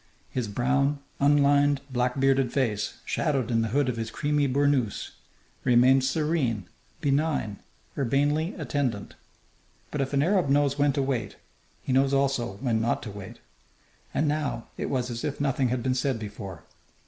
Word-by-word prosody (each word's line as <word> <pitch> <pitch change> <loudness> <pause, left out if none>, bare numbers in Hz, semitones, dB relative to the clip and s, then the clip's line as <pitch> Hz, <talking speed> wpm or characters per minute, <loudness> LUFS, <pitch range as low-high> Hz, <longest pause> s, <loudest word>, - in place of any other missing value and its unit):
His 125 -4 -2
brown, 140 +6 +1 0.2
unlined, 145 0 +4
black 125 +1 0
bearded 135 -2 +3
face, 110 -6 -1
shadowed 135 -6 0
in 115 -1 +2
the 115 - 0
hood 135 +5 +1
of 125 -2 -1
his 115 0 -3
creamy 145 +3 0
burnoose, 135 -4 +1 0.5
remained 130 +2 +5
serene, 135 - 0 0.4
benign, 140 -7 0 0.4
urbanely 145 +6 +1
attendant. 140 - -2 0.8
But 150 - -1
if 135 - -2
an 140 0 +3
Arab 180 -3 +2
knows 140 0 +2
when 145 0 +4
to 140 -1 0
wait, 120 -7 -2 0.5
he 130 - -1
knows 135 +1 +3
also 135 -4 +1
when 115 -4 +1
not 120 +1 0
to 105 - -6
wait. 100 +3 -10 0.7
And 150 - 0
now 145 -6 -2
it - - -3
was 125 -2 -1
as 115 0 -5
if 145 -2 -3
nothing 135 -2 +1
had 120 0 -1
been 130 - +1
said 130 0 0
before. 100 -5 -8
135 Hz, 160 wpm, -27 LUFS, 120-145 Hz, 0.8 s, remained